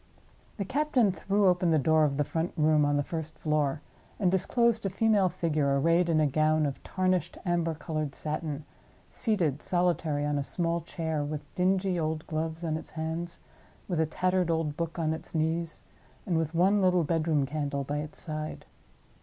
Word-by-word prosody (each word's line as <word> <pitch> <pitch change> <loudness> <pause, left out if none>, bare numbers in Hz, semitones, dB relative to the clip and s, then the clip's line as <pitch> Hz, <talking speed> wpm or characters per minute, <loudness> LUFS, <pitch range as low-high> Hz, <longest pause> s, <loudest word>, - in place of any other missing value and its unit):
The 200 - -2
captain 260 -4 +2
threw 200 +2 0
open 180 -1 +3
the 160 - +4
door 155 +2 +4
of 140 -2 -1
the 150 - +2
front 165 +4 -2
room 155 -1 +4
on 145 0 +2
the 145 - +1
first 160 0 -5
floor, 150 -2 0 0.4
and 185 -4 +3
disclosed 225 +4 +2
a 195 - 0
female 205 -1 +3
figure, 150 -5 0
arrayed 170 +4 +3
in 160 -2 +3
a 155 - +4
gown 155 +2 +2
of 140 -2 -3
tarnished 185 -2 -1
amber 170 -2 0
colored 155 -1 -3
satin, 150 -1 -3 0.5
seated 165 - +1
solitary 170 -5 0
on 145 -1 0
a - - -1
small 170 +3 -1
chair, 160 -2 -3
with 145 0 -4
dingy 185 0 +1
old 155 0 -2
gloves 160 +1 -3
on 155 -1 0
its - - -9
hands, 165 +2 -4 0.5
with 175 -4 -1
a 160 - +2
tattered 185 +2 +1
old 160 -3 0
book 165 +1 -3
on 160 -2 0
its 160 - -8
knees, 160 0 -1 0.4
and 175 - 0
with 160 0 -1
one 195 +4 +4
little 180 -2 +3
bedroom 155 -2 +1
candle 140 -1 -2
by 145 +2 -3
its 150 +1 -5
side. 155 -2 -4
160 Hz, 180 wpm, -29 LUFS, 155-180 Hz, 0.5 s, the